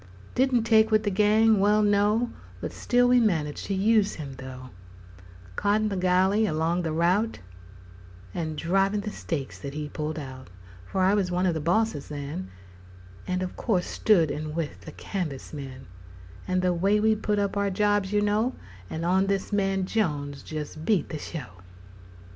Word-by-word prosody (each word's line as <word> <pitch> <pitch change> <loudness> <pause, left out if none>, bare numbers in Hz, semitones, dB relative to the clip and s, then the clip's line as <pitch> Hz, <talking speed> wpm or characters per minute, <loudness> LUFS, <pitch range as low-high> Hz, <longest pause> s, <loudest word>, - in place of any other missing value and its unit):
Didn't 255 -2 +2
take 220 -1 +4
with 215 -1 +3
the 205 - 0
gang 215 +2 +4
well, 210 +2 +4
no 210 +3 +2 0.3
But - - -5
still 245 0 +2
we 250 0 +5
managed 160 -10 0
to 195 - -1
use 210 +1 +3
him, 145 -4 -7
though, 130 -1 -9 0.8
Coddin' 210 - +1
the 200 - -2
gilley 190 +3 +3
along 160 +3 0
the 165 -2 -2
rout' 180 +8 +1 1.0
And 155 -2 -3
drivin' 195 +5 +1
the 210 +1 -5
stakes 145 -9 -5
that 140 -1 -7
he 150 -1 -4
pulled 155 +1 -4
out; 130 - -8 0.4
For 190 - -1
I 190 +2 +4
was 200 -3 +1
one 180 +1 0
of 180 - +2
the 160 - -2
bosses 170 -1 0
then 140 -10 -5 0.8
And 185 0 -1
of 185 - -5
course 190 -7 0
stood 170 -8 +3
in 155 0 -4
with 165 -3 -4
the 155 - -7
canvas 155 -7 -5
men 135 -3 -8 0.6
And 185 0 0
the 180 -1 +3
way 195 +5 +2
we 220 +1 +3
put 210 -1 -1
up 200 -1 0 0.2
jobs, 205 0 +1
you 210 0 +2
know, 210 +5 +1 0.3
On 180 +4 +1
this 200 +1 -1
man 195 -2 +1
Jones 145 -10 -2
jes' 150 -2 -5
beat 180 +5 0
the 155 - -5
show! 120 - -8
185 Hz, 170 wpm, -26 LUFS, 155-210 Hz, 1.0 s, we